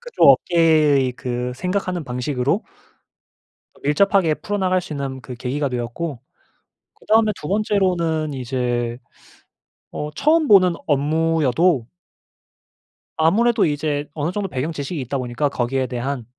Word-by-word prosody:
그쪽 485 Hz, 0 st, 0 dB
업계의 155 Hz, -6 st, +4 dB
그 125 Hz, 0 st, -4 dB
생각하는 180 Hz, +3 st, -2 dB
방식으로 130 Hz, -, -1 dB, 1.2 s
밀접하게 165 Hz, +3 st, +3 dB
풀어나갈 185 Hz, -2 st, -1 dB
수 165 Hz, -, -8 dB
있는 135 Hz, -2 st, -5 dB
그 125 Hz, +1 st, -8 dB
계기가 135 Hz, +4 st, -2 dB
되었고 125 Hz, +4 st, -4 dB, 0.8 s
그 -, -, -23 dB
다음에 215 Hz, 0 st, +4 dB
2 150 Hz, -, -6 dB
번째로는 180 Hz, -7 st, 0 dB
이제 120 Hz, -2 st, -2 dB, 0.9 s
어 150 Hz, -, -5 dB
처음 310 Hz, +1 st, +2 dB
보는 185 Hz, -4 st, +6 dB
업무여도 155 Hz, -1 st, +1 dB, 1.3 s
아무래도 220 Hz, +8 st, +3 dB
이제 145 Hz, -1 st, -1 dB
어느 155 Hz, +2 st, -2 dB
정도 205 Hz, +1 st, -3 dB
배경 140 Hz, +2 st, -3 dB
지식이 150 Hz, +1 st, -5 dB
있다 130 Hz, +2 st, -3 dB
보니까 125 Hz, +3 st, -1 dB
거기에 130 Hz, 0 st, -1 dB
대한. 125 Hz, 0 st, -4 dB
150 Hz, 280 characters per minute, -21 LUFS, 130-180 Hz, 1.3 s, 보는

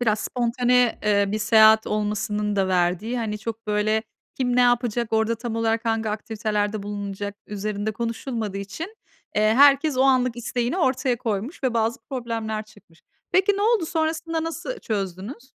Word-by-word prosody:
biraz 220 Hz, -3 st, +1 dB
spontane, 245 Hz, 0 st, +1 dB
eee, 200 Hz, -1 st, +3 dB
bir 215 Hz, +2 st, -1 dB
seyahat 220 Hz, 0 st, +6 dB
olmasının 210 Hz, 0 st, -1 dB
da 190 Hz, -1 st, +2 dB
verdiği, 185 Hz, +7 st, 0 dB
hani, 210 Hz, -2 st, -3 dB
çok, 225 Hz, 0 st, -6 dB
böyle, 215 Hz, +1 st, +1 dB, 0.3 s
kim 245 Hz, -2 st, 0 dB
ne -, -, +5 dB
yapacak, 240 Hz, -2 st, +1 dB
orada 220 Hz, +1 st, +2 dB
tam 230 Hz, 0 st, -5 dB
olarak 225 Hz, +1 st, 0 dB
hangi 225 Hz, -1 st, 0 dB
aktivitelerde 210 Hz, -1 st, -2 dB
bulunulacak 205 Hz, 0 st, -5 dB
üzerinde 210 Hz, +1 st, -3 dB
konuşulmadığı 230 Hz, -2 st, -3 dB
için, 320 Hz, -, -7 dB, 0.4 s
eee, 210 Hz, -, +3 dB
herkes 280 Hz, +1 st, +5 dB
o 260 Hz, -, +4 dB
anlık 255 Hz, -3 st, +3 dB
isteğini 240 Hz, +6 st, -2 dB
ortaya 260 Hz, -5 st, +1 dB
koymuş 225 Hz, -, -3 dB
ve 250 Hz, -3 st, 0 dB
bazı 225 Hz, +1 st, +1 dB
problemler 225 Hz, -4 st, -3 dB
çıkmış. 205 Hz, -6 st, -21 dB, 0.3 s
Peki 380 Hz, +3 st, +4 dB
ne 405 Hz, -, -1 dB
oldu, 435 Hz, -7 st, +2 dB
sonrasında 320 Hz, 0 st, -1 dB
nasıl 345 Hz, +9 st, -5 dB
çözdünüz? 210 Hz, -, -5 dB
225 Hz, 155 wpm, -24 LUFS, 210-250 Hz, 0.4 s, seyahat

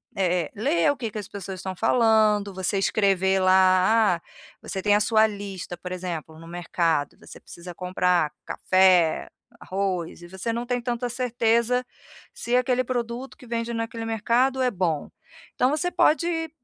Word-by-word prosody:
eh 180 Hz, -2 st, +1 dB
eh, -, -, -12 dB
ler 285 Hz, +8 st, +2 dB
o -, -, -3 dB
que 230 Hz, -4 st, -4 dB
que 215 Hz, -, -7 dB
as 205 Hz, -, -7 dB
pessoas 190 Hz, -2 st, -7 dB
estão 190 Hz, 0 st, -5 dB
falando, 215 Hz, -2 st, +3 dB
você 190 Hz, +1 st, -2 dB
escrever 195 Hz, -1 st, +2 dB
lá, 185 Hz, +2 st, +4 dB
ah, 170 Hz, -, -21 dB, 0.4 s
você 190 Hz, -, -5 dB
tem 205 Hz, +1 st, +3 dB
a 210 Hz, -, +2 dB
sua 220 Hz, +1 st, +4 dB
lista, 200 Hz, -4 st, -7 dB
por 180 Hz, +1 st, -8 dB
exemplo, 170 Hz, -3 st, -6 dB
no 165 Hz, -, -12 dB
mercado, 165 Hz, -3 st, -1 dB
você -, -, -13 dB
precisa 175 Hz, 0 st, -11 dB
comprar 180 Hz, -3 st, +1 dB
café, 185 Hz, -3 st, +3 dB, 0.3 s
arroz 185 Hz, -3 st, -3 dB
e 175 Hz, -, -11 dB
você 190 Hz, +5 st, -4 dB
não 235 Hz, +1 st, -3 dB
tem 245 Hz, 0 st, -1 dB
tanta 240 Hz, 0 st, -2 dB
certeza 240 Hz, 0 st, +1 dB, 0.5 s
se 240 Hz, -, -2 dB
aquele 250 Hz, 0 st, +2 dB
produto 245 Hz, +1 st, -4 dB
que -, -, -15 dB
vende 235 Hz, 0 st, -3 dB
naquele 230 Hz, 0 st, -4 dB
mercado 235 Hz, +4 st, +1 dB
é 250 Hz, -1 st, +2 dB
bom. 175 Hz, -6 st, -1 dB, 0.5 s
Então, 250 Hz, -, +2 dB
você 355 Hz, +4 st, -1 dB
pode 325 Hz, 0 st, +1 dB
205 Hz, 165 wpm, -24 LUFS, 185-235 Hz, 0.5 s, lá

